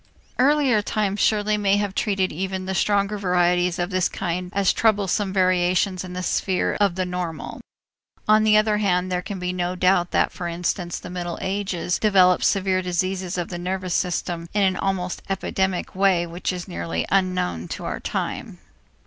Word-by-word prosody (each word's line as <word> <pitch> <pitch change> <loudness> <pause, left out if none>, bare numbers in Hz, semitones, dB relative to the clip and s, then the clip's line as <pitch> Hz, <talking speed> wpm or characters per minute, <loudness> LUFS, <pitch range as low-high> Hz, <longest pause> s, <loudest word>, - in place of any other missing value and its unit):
Earlier 270 -4 +4
times 205 -1 -1
surely 210 0 +2
may 200 -1 +2
have 205 -2 -1
treated 195 -2 0
even 190 +2 -3
the 190 - -2
stronger 200 +1 +1
varieties 180 -1 +2
of 175 +2 -2
this 185 -1 +1
kind 180 +1 -3
as 200 -2 +2
troublesome 205 -2 +1
variations 185 0 +2
in 180 -1 -8
the 180 0 -4
sphere 185 0 0
of 200 -4 +3
the 185 0 -1
normal. 180 -3 -5 0.7
On 215 0 +5
the 215 -1 +5
other 215 0 +2
hand, 185 -2 +1
there 180 0 0
can 195 +2 -6
be 180 0 -3
no 180 0 -2
doubt 180 -1 +2
that, - - +1
for 175 - -5
instance, 175 +1 -2
the 180 - -9
Middle 175 -1 -4
Ages 190 -3 -2
developed 185 -4 +4
severe 190 -1 +2
diseases 185 0 -2
of 175 - -3
the 175 - -5
nervous 185 0 -3
system 170 -1 -2
in 205 - +3
an 190 -1 +2
almost 185 -1 -2
epidemic 190 -1 -1
way 185 -3 +3
which 170 +3 -3
is 180 -1 -6
nearly 85 -1 -3
unknown 185 - 0
to - - -6
our - - -3
time. - - -4
185 Hz, 175 wpm, -23 LUFS, 180-200 Hz, 0.7 s, On